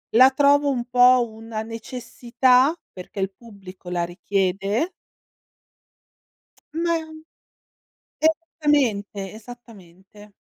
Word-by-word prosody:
La 260 +3 +8
trovo 285 +1 +3
un 245 -3 -2
po' 245 -1 +5
una 220 0 -7
necessità, 250 +4 +1 0.2
perché 185 +2 -10
il 195 0 -1
pubblico 195 -5 -12
la 175 -1 -1
richiede. 195 - -1 1.8
Mah 330 0 -1 1.2
esattamente, 290 - 0
esattamente. 210 -4 -15
230 Hz, 80 wpm, -23 LUFS, 195-265 Hz, 1.8 s, La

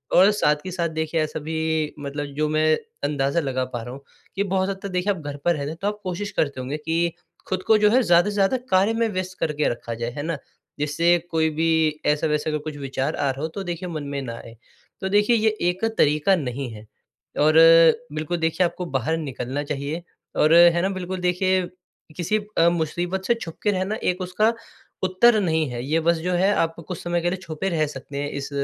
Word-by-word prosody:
और 190 +3 +7
साथ 150 -7 +2
ही 185 - -4
साथ 170 -2 -1
देखिए 160 0 -1
ऐसा 155 0 -3
भी 160 +2 -4 0.4
मतलब 145 +1 -4
जो 150 +1 +1
मैं 155 0 +3 0.3
अंदाज़ा 145 +2 +1
लगा 130 -4 -1
पा 120 - -3
रहा 120 +2 -7
हूँ 135 - -10 0.3
कि 195 - +1
बहुत 190 -1 0
हद 195 -1 -4
तक 200 - -4
देखिए 185 +2 0
आप 190 - -8
घर 145 -1 -6
पर 175 -1 +3
रहते 140 -1 -3
हैं, 160 - -7
तो 200 - 0
आप 210 0 -2
कोशिश 190 +2 -4
करते 140 -3 -1
होंगे 135 +4 -4
कि 165 +2 -1 0.4
ख़ुद 185 -1 -2
को 220 -1 +6
जो 210 0 +4
है 255 +3 +5
ज़्यादा 175 0 +4
से - - -4
ज़्यादा 200 +5 +2
कार्य 195 +4 +3
में 230 0 +1
व्यस्त 185 0 -4
करके 150 -1 0
रखा 120 0 -5
जाए, 115 +1 -4
है 145 +3 -5
ना? 165 -2 -2 0.4
जिससे 165 +4 +3
कोई 160 -1 +2
भी 160 -2 +2
ऐसा-वैसा 150 +1 +1
अगर 150 - 0
कुछ 155 -1 -5
विचार 135 +1 -2
आ 145 -1 0
रहा 135 +1 -7
हो 160 - -1
तो 195 +5 -6
देखिए 175 0 -4
मन 155 -3 -4
में 140 - -2
ना 120 -3 -5
आए। 115 - -11 0.5
तो 190 - -2
देखिए 210 +4 +4
ये 220 -1 +3 0.2
एक 185 +5 -2
तरीक़ा 150 +6 +4
नहीं 135 -4 -4
है 110 0 -11 0.5
और 155 +1 +4 0.6
बिल्कुल 155 +3 -2
देखिए, 165 +2 +1
आपको 180 +1 -3
बाहर 150 +1 -1
निकलना 140 -2 -4
चाहिए 150 +3 -4 0.3
और 155 +1 +4
है 170 0 +7
ना 190 - +1
बिल्कुल 185 0 -4
देखिए 185 +1 +2 0.6
किसी 180 +5 0 0.2
अ, 165 +1 +6
मुसीबत 175 +3 -2
से 235 - +4
छुप 165 -8 -8
के 210 - +3
रहना 190 +2 -1
एक 180 +1 0
उसका 185 +5 +1 0.5
उत्तर 215 +5 +4
नहीं 160 -4 +1
है, 120 -1 -5
ये 155 +4 +1
बस 170 +1 +2
जो 180 +3 -2
है 185 +3 +3
आप 165 0 0
कुछ 180 - -4
समय 175 0 0
के 175 - +1
लिए 185 - -2
छुपे 170 +1 -3
रह 160 -4 +1
सकते 140 0 -8
हैं 145 0 -2
इस 140 0 -5
165 Hz, 225 wpm, -23 LUFS, 150-185 Hz, 0.6 s, और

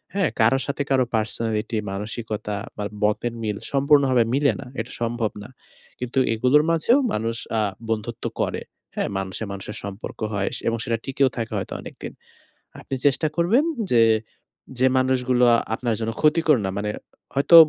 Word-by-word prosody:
হ্যাঁ? 195 -5 +2
কারো 115 +4 +5
সাথে 140 0 -1
কারো 130 -2 +4
পার্সোনালিটি, 110 0 -1
মানসিকতা 105 0 -4 0.2
বা 105 - -2 0.2
মতের 105 +3 +1
মিল 105 -2 -1
সম্পূর্ণভাবে 140 -3 +4
মিলে 140 +1 +4
না। - - -9 0.2
এটা 120 - -9
সম্ভব 115 -2 0
না। - - -11 0.5
কিন্তু 125 +1 -1
এগুলোর 125 +6 +4
মাঝেও 165 - +4 0.2
মানুষ 115 +2 -1 0.2
আ - - +2 0.3
বন্ধুত্ব 110 -2 -3 0.2
করে। - - -1 0.3
হ্যাঁ - - -1
মানুষে 95 +3 -4
মানুষের 100 +1 -6
সম্পর্ক 100 +1 -7
হয় 100 -1 0
স - - 0
এবং 115 - +1
সেটা 115 -1 0
টিকেও 135 0 +2
থাকে 115 -2 -3
হয়তো - - -4
অনেকদিন। - - -8 0.7
আপনি 135 - -4
চেষ্টা 145 +3 +3
করবেন 205 - +4 0.3
যে, 115 - +6 0.8
যে 130 - +4
মানুষগুলো 130 -1 +3 0.3
আপনার 120 -1 -1
জন্য 115 0 -1
ক্ষতিকর 155 -1 +4
না, - - 0
মানে 105 - -2 0.5
হয়তো 140 +5 +5
120 Hz, 155 wpm, -23 LUFS, 110-140 Hz, 0.8 s, যে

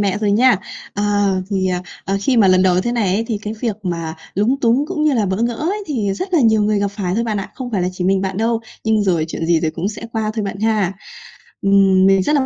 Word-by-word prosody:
mẹ 200 -1 0
rồi 210 -1 0
nha. 240 +1 +5 0.4
Ờ, 205 - -2 0.5
thì, 190 -2 0
à, 180 -1 -1 0.2
ờ, 195 - -1
khi 255 +4 +1
mà 205 -4 +5
lần 185 0 +5
đầu 185 -1 +3
thế 240 +5 -2
này 205 -6 +1
ấy, 225 - 0
thì 220 - -1
cái 210 - -4
việc 225 -5 -1
mà 165 -3 -3 0.2
lúng 235 +8 +1
túng 245 +5 +2
cũng 315 -3 -2
như 305 - +3
là 215 -4 +1
bỡ 190 0 -1
ngỡ 235 0 0
ấy 370 - -2
thì 220 -10 -1
rất 370 - -4
là 320 - +4
nhiều 220 -3 +4
người 210 0 +1
gặp 200 - 0
phải 195 -3 -3
thôi 230 +3 0
bạn 220 -2 -2
ạ, 195 - -7
không 255 -2 -6
phải 195 -5 0
là 180 - 0
chỉ 180 0 -4
mình 190 +1 +2
bạn 190 -1 -3
đâu, 225 +2 0 0.2
nhưng 220 -1 +2
rồi 175 -5 +1
chuyện 165 - -4
gì 165 -1 +3
rồi 155 -1 0
cũng 170 +5 -3
sẽ 215 +2 -7
qua 220 -1 -1
thôi 215 - -2
bạn 195 0 -5
ha. 215 -4 +1 0.7
Ừm, 195 -1 +4
mình 195 -1 +4
rất 300 - +1
là 270 -2 +2
205 Hz, 280 wpm, -18 LUFS, 190-230 Hz, 0.7 s, nha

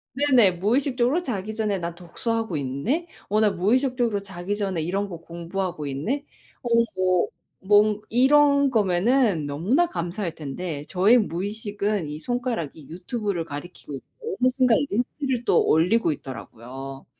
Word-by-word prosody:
네네 260 -9 +5
무의식적으로 255 - +1
자기 215 - -4
전에 210 -4 0
'나 170 0 -4
독서하고 220 +3 -3
있네.' 140 - -2 0.2
어 210 +1 +2
나 215 -1 +4
무의식적으로 230 +2 +1
'자기 195 +1 -4
전에 195 -5 -2
이런 195 +4 -1
거 170 - -6
공부하고 170 -1 -4
있네.' 220 - -2 0.4
어 240 - -3 0.3
뭐 185 -1 +2 0.4
뭐 210 +1 +4
이런 280 +3 +5
거면은 205 - +2
너무나 190 - +1
감사할 175 - -4
텐데 150 +1 -5
저의 200 +7 +5
무의식은 205 -1 -2
이 150 +1 -6
손가락이 230 - -3
유튜브를 185 0 -3
가리키고 145 0 -8
있고 450 - -8
어느 255 - +5
순간 255 -3 +3
리스트를 250 +2 -1
또 - - +4
올리고 170 +4 +3
있더라고요. 135 +1 -8
200 Hz, 330 characters per minute, -24 LUFS, 170-245 Hz, 0.4 s, 네네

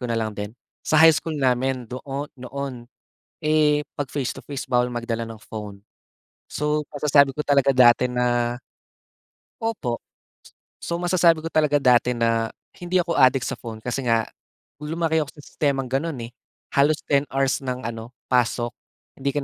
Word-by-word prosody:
ko 125 - -4
na 115 - 0
lang 110 -1 -1
din. 105 +3 -6 0.2
Sa 155 - +1
high 160 +1 +8
school 155 0 -3
namin 130 -1 +1
doo 135 +4 -5 0.2
noon, 125 -1 -6 0.5
eh, 150 -1 +3 0.2
'pag 145 - -1
face 135 -2 -2
to - - -10
face 140 -1 -6
bawal 125 0 +3
magdala 120 -1 -3
ng 115 -1 -10
phone. 105 -2 -8 0.7
So 150 +1 0
masasabi 140 -1 +3
ko 150 - -2
talaga 140 -1 +3
dati 125 -1 +5
na 120 -1 0 1.0
Opo. 205 - -2 0.8
So, 170 - -2
masasabi 170 -2 +3
ko 165 - -2
talaga 150 -2 +3
dati 125 -2 +3
na, 115 -1 +1 0.2
hindi 180 +1 -1
ako 170 -1 +1
addict 130 -3 +4
sa - - -2
phone 115 -2 -7
kasi 125 +2 -2
nga, 115 -3 +2 0.6
lumaki 160 +1 0
ako 145 - -4
sa 145 - -12
sistemang 140 -3 -1
gan'n 135 +3 -2
eh, 115 - -11 0.4
halos 145 +2 +4
10 140 -1 +3
hours 135 0 0
ng 125 -2 -4
ano, 115 0 -5 0.2
pasok 120 -1 +1 0.4
hindi 140 +1 -2
ka 145 - 0
135 Hz, 165 wpm, -23 LUFS, 120-150 Hz, 1.0 s, high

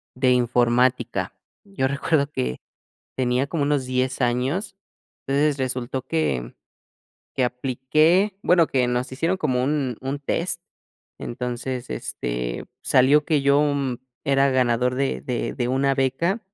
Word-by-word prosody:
de 130 0 +3
informática. 120 -4 +2 0.3
Yo 195 -10 -1
recuerdo 140 +1 0
que 65 - -2 0.6
tenía 130 +1 +1
como 150 0 -1
unos 140 -2 +1
10 130 +1 -1
años, 130 - 0 0.5
entonces 145 +1 +2
resultó 130 0 -3
que 70 - -1 0.8
que 130 - +1
apliqué, 155 +10 +2
bueno, 175 -2 +5
que 125 -2 +1
nos 125 +1 -1
hicieron 165 +8 0
como 125 -7 0
un 135 -4 -1
un 135 +2 -3
test, 165 +5 -2 0.6
entonces, 125 +1 -4
este, - - -4 0.2
salió 140 +4 +4
que 150 -4 +2
yo, 140 +1 +4
mm, 140 -4 -1 0.3
era 140 0 +3
ganador 125 -1 +2
de 135 0 -1
de 125 -2 -2
de 120 -1 -1
una 135 +2 +2
beca 135 - 0
130 Hz, 130 wpm, -23 LUFS, 125-140 Hz, 0.8 s, bueno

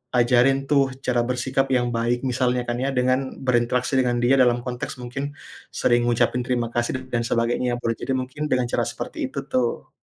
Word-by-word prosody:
ajarin 125 +3 +4
tuh 140 -2 +3
cara 125 -1 +2
bersikap 130 +2 0
yang 120 -2 +1
baik 120 +1 0
misalnya 125 -1 +1
kan 120 0 -2
ya 135 - 0
dengan 130 +1 0
berinteraksi 125 +1 +1
dengan 125 -1 +1
dia 130 +3 +5
dalam 120 -1 +4
konteks 125 -1 -4
mungkin 135 +4 -5 0.4
sering 120 0 +1
ngucapin 120 +1 +2
terima 120 -2 0
kasih 120 +2 0
dan - - -10 0.2
dan - - -2
sebagainya 120 +1 0
boleh 115 - 0
jadi 135 - -3
mungkin 130 +4 -4
dengan 125 -1 +3
cara - - +1
seperti - - -4
itu 140 - -5
tuh. 125 -2 -1
125 Hz, 185 wpm, -23 LUFS, 120-130 Hz, 0.4 s, dia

